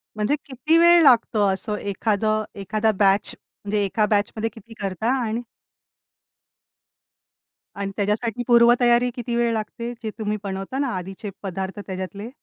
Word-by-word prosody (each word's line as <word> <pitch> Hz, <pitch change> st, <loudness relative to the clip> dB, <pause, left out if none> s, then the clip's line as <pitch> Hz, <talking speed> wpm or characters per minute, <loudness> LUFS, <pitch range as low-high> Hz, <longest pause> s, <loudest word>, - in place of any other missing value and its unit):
म्हणजे 215 Hz, +6 st, +1 dB
किती 280 Hz, +5 st, +1 dB
वेळ 340 Hz, +1 st, +7 dB
लागतो, 230 Hz, -6 st, +4 dB
असं 210 Hz, +2 st, -3 dB
एखादा 215 Hz, +1 st, 0 dB, 0.2 s
एखादा 215 Hz, +3 st, +1 dB
बॅच 200 Hz, 0 st, +3 dB, 0.3 s
म्हणजे 205 Hz, 0 st, 0 dB
एका 210 Hz, +2 st, +1 dB
बॅचमध्ये 210 Hz, +2 st, 0 dB
किती 225 Hz, 0 st, -14 dB
करता? 200 Hz, +4 st, -1 dB
आणि 225 Hz, +2 st, -2 dB, 2.3 s
आणि 200 Hz, -1 st, -4 dB
त्याच्यासाठी 215 Hz, +3 st, -1 dB
पूर्वतयारी 240 Hz, 0 st, +5 dB
किती 240 Hz, -1 st, -3 dB
वेळ 235 Hz, -1 st, +1 dB
लागते? 230 Hz, +2 st, -4 dB
जे 220 Hz, -, -2 dB
तुम्ही 210 Hz, -1 st, -1 dB
बनवता 195 Hz, +6 st, -4 dB
ना 280 Hz, -, +1 dB
आधीचे 190 Hz, +3 st, -7 dB
पदार्थ 190 Hz, +1 st, -4 dB
त्याच्यातले? 195 Hz, +2 st, -6 dB
215 Hz, 130 wpm, -23 LUFS, 200-235 Hz, 2.3 s, वेळ